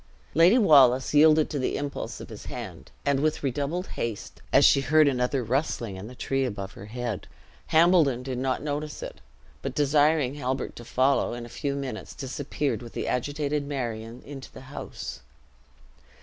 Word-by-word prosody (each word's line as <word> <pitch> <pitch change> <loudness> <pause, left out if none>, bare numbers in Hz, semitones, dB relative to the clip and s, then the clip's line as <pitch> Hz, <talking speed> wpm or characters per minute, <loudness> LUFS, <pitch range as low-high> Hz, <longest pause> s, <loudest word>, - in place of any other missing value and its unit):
Lady 170 +9 +6
Wallace 135 - +5
yielded 155 +1 +6
to 145 - -2
the 130 - -1
impulse 145 -1 -4
of - - -9
his - - -10
hand, - - -7 0.2
and 140 -1 +2
with 155 +1 0
redoubled 145 +7 -1
haste, 115 -3 -5
as - - +6
she 140 - +6
heard 155 +3 +4
another 125 0 +1
rustling 120 -4 -1
in 95 +3 -8
the 125 - -10
tree 135 +2 -1
above 100 -6 -4
her 100 - -10
head. 120 -2 -4 0.4
Hambledon 160 -6 +4
did 130 -1 -4
not 130 +1 -1
notice 150 0 -4
it; - - -8 0.4
but - - -4
desiring 145 -1 +3
Halbert 130 -2 -3
to 120 - -8
follow, 130 +2 +2
in 120 0 -6
a - - -11
few 140 +3 -3
minutes 135 -6 -5
disappeared 135 -2 -3
with 120 -1 -10
the - - -3
agitated 145 +2 -1
Marion 120 -4 -4
into 135 -2 -9
the - - -11
house. - - -7
135 Hz, 170 wpm, -26 LUFS, 125-150 Hz, 0.4 s, Lady